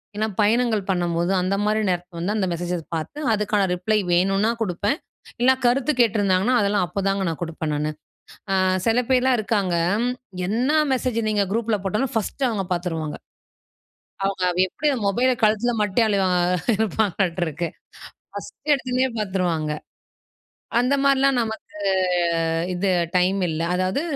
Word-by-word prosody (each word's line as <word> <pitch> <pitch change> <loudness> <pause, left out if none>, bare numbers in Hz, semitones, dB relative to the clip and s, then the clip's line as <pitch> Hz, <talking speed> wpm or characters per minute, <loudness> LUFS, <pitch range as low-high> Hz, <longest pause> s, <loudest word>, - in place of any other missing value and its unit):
இல்லன்னா 215 +1 -1
பயணங்கள் 220 0 +2
பண்ணும்போது, 175 -1 0
அந்த 185 +2 0
மாரி 215 +1 +1
நேரத்தில 175 0 -5
வந்து 205 +5 -1
அந்த 190 -3 0
மெசேஜை 175 +1 -3 0.2
பாத்து, 165 - -5
அதுக்கான 210 -2 +1
ரிப்ளை 210 +4 +1
வேணுனா 195 +5 +2
குடுப்பேன், 205 - -1 0.4
இல்னா 260 +2 +5
கருத்து 260 +4 +2
கேட்டிருந்தாங்கன்னா, 205 0 +2
அதெல்லாம் 200 -2 +1
அப்பதாங்க 195 +1 -1
நான் 165 - -5
குடுப்பேன் 160 -2 -4
நானு. 150 +1 -1 0.6
அ - - +2 0.3
செல 230 +2 +3
பேர்லாம் 255 -1 +3
இருக்காங்க 200 -4 0 0.3
ம். 250 - +1 0.4
என்னா 255 +8 +1 0.2
மெசேஜு 245 -3 -1
நீங்க 205 -2 +1
குரூப்ல 225 -1 0
போட்டாலும், 220 +7 -1
1டு 240 +5 -1
அவுங்க 200 -4 -2
பாத்துருவாங்க. 165 -3 -3 1.1
அவுங்க 195 -2 -1
வ் 185 - +5
எப்படி 300 +11 -1
அந்த 230 -5 -3
மொபைல 250 +6 +2
கழுத்தில 220 +3 +2
மாட்டிட்டே 210 +2 +2
அலைவா 195 -3 +2 0.5
இருப்பாங்களாட்ருக்கு. 180 -6 -1 0.7
1டு 255 +8 -5
எடுத்தோனே 255 -1 0
பாத்துருவாங்க. 180 -6 -1 1.1
அந்த 250 +3 +2
மாரிலாம் 275 -1 +3
நமக்கு 220 -2 -6 1.0
இது 190 +2 0 0.3
டைம் 185 +2 +2
இல்ல. 155 - -3
அதாவது, 185 +8 0
205 Hz, 135 wpm, -23 LUFS, 180-235 Hz, 1.1 s, இல்னா